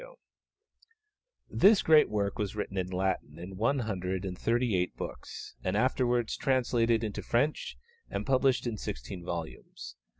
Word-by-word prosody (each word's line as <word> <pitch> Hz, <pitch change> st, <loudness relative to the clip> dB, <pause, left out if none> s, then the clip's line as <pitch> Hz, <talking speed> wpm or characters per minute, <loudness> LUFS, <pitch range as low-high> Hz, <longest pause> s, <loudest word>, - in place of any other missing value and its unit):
] 450 Hz, +2 st, -38 dB, 0.2 s
This 200 Hz, +1 st, +7 dB
great 155 Hz, -1 st, +6 dB
work 100 Hz, -2 st, -1 dB
was 105 Hz, -1 st, -2 dB
written 105 Hz, -2 st, -4 dB
in 95 Hz, -1 st, -1 dB
Latin 95 Hz, 0 st, -2 dB
in 90 Hz, +3 st, -8 dB
one 115 Hz, +8 st, +1 dB
hundred 95 Hz, -3 st, -3 dB
and 90 Hz, -1 st, -4 dB
thirty 120 Hz, +1 st, +1 dB
eight 90 Hz, 0 st, 0 dB
books, -, -, -7 dB
and 95 Hz, +2 st, 0 dB
afterwards 125 Hz, -1 st, +1 dB
translated 120 Hz, -3 st, +2 dB
into 105 Hz, -2 st, -3 dB
French 140 Hz, +6 st, 0 dB, 0.3 s
and -, -, -3 dB
published 130 Hz, -1 st, +2 dB
in 115 Hz, -3 st, -2 dB
sixteen 75 Hz, +3 st, -6 dB
volumes. 85 Hz, -7 st, -6 dB
110 Hz, 145 wpm, -30 LUFS, 95-130 Hz, 0.3 s, This